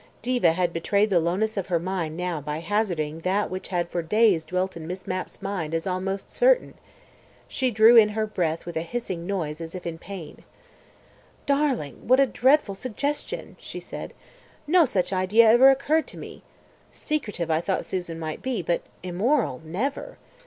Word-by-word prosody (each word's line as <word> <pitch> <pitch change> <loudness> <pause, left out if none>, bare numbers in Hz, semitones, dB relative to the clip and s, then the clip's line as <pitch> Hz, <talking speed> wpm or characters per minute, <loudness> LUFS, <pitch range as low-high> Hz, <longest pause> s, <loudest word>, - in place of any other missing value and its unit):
Diva 240 -9 +3
had 175 0 0
betrayed 200 +5 +1
the 180 - +5
lowness 195 +6 -1
of 195 - -2
her 180 -3 +1
mind 170 -2 -3
now 180 -3 -2
by 150 +1 -4
hazarding 165 -4 -1
that 190 +4 0
which 185 0 -5
had 175 -2 -1
for 175 - -2
days 200 -1 +3
dwelt 185 +1 -2
in 160 -1 -8
Miss 185 +2 -6
Mapp's 185 +1 -5
mind 180 -5 -3
as 165 - -2
almost 195 +1 -3
certain. - - +3 0.7
She 260 -2 0
drew 225 +1 +6
in 220 -2 +8
her 220 - +1
breath 170 -6 -2
with 175 - -7
a 160 - 0
hissing 180 -2 -4
noise 165 -6 -3
as 165 +2 -7
if 180 - -7
in 165 -1 -5
pain. 180 -5 -9 1.0
"Darling, 275 - -1
what 255 +2 +5
a 275 - +6
dreadful 260 -3 +3
suggestion," 260 +7 -4
she - - -7
said. - - -8 0.5
"No 335 +2 +5
such 185 -6 -1
idea 195 +5 +4
ever 255 +4 +8
occurred 285 +4 +2
to - - -10
me. - - -9 0.5
Secretive 210 - -3
I 160 +1 +2
thought 190 +2 -1
Susan 175 -3 -4
might 155 -1 -5
be, 255 -7 -2
but 170 +1 0 0.2
immoral, 185 - 0
never. 205 - -4
185 Hz, 175 wpm, -25 LUFS, 170-230 Hz, 1.0 s, in